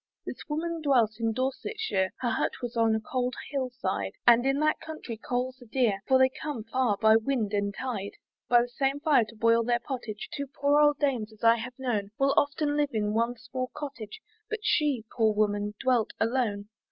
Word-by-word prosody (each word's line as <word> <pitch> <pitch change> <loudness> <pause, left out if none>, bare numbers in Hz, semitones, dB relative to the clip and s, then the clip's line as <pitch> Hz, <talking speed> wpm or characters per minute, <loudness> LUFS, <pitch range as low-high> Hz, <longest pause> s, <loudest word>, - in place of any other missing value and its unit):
This - - -6
woman 330 +2 -2
dwelt 240 -7 +2
in 225 -1 +1
Dorsetshire, 255 - -1
Her 245 - 0
hut - - 0
was 240 0 -4
on 225 -1 +3
a - - 0
cold 250 +3 -2 0.2
hill 270 -3 -1
side, 100 - -3
And 240 +2 +6
in 270 +1 +2
that 310 0 +2
country 315 -7 -7
coals 255 +1 -3
are 245 - -13
dear, 220 -5 +1
For 260 - +5
they 260 0 +5
come 290 -8 -4
far 225 -2 0
by 220 +1 +6
wind 225 -3 -1
and 200 0 0
tide. 205 -3 -4 0.4
By 240 -1 +6
the 245 - -6
same 270 +3 -1
fire 290 -6 +3
to 220 +2 -14
boil 230 +1 +3
their 240 +1 +1
pottage, 235 -4 -6
Two 280 -1 -4
poor 285 +2 +2
old 295 -1 +5
dames, 255 -8 0
as 215 0 -19
I 230 0 +6
have 250 +2 -7
known, 230 -7 -2
Will 275 0 +3
often 290 +1 +1
live 295 -1 +1
in 210 -1 0
one 235 +2 0
small 255 +1 -5
cottage, 280 - -7 0.3
But 440 -1 -3
she, 285 - +1
poor 220 -3 +3
woman, 205 0 0
dwelt 250 -4 +1
alone. 225 -4 0
245 Hz, 200 wpm, -28 LUFS, 220-275 Hz, 0.4 s, And